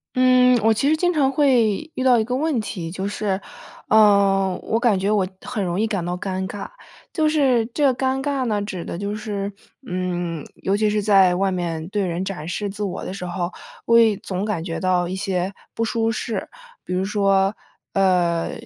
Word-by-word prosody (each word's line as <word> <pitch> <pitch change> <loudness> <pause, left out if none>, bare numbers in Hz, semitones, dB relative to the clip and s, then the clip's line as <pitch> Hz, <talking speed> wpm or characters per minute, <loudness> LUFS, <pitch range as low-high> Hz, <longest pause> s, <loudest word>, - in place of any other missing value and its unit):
嗯， 255 -1 +5
我 225 - +5
其 275 +6 +1
实 315 - +3
经 355 +2 +1
常 285 -5 +2
会 265 -2 +2
遇 260 - -3
到 255 -2 +5
一 220 - +1
个 250 +3 -3
问 295 0 0
题， 175 -6 -5
就 190 +2 -4
是， 205 -2 -1 0.5
呃， 200 -3 +4
我 225 +1 -1
感 225 -6 +3
觉 195 +2 0
我 205 -3 +2 0.2
很 250 -5 -3
容 175 -1 -2
易 220 - +2
感 200 -5 -2
到 175 +1 -2
尴 190 0 -3
尬。 205 - -6 0.5
就 315 -3 +2
是 265 -7 +2
这 295 - +1
个 265 -2 +4
尴 265 +1 -1
尬 280 -2 -1
呢 210 -3 0
指 190 -4 -5
的 - - -5
就 200 +3 -3
是， 205 -2 -4 0.3
嗯， 175 -5 -3 0.2
尤 195 - +1
其 215 +1 +2
是 210 0 0
在 195 -3 +5
外 195 +1 +1
面 170 -3 -3
对 200 -1 0
人 175 +1 -2
展 180 -5 -5
示 205 +3 -3
自 205 +2 -6
我 190 -3 -3
的 - - -5
时 185 -2 -6
候， 175 0 -3 0.3
我 230 - +5
也 225 -3 +5
总 190 -1 -4
感 190 -7 -2
觉 165 -2 -4
到 180 -1 +1
一 185 - -3
些 190 -1 -2 0.2
不 230 - -1
舒 225 0 0
适， 225 0 -3 0.4
比 180 - -4
如 185 +1 0
说， 195 -1 +2 0.4
呃， 180 -3 +2
200 Hz, 220 characters per minute, -22 LUFS, 185-230 Hz, 0.5 s, 嗯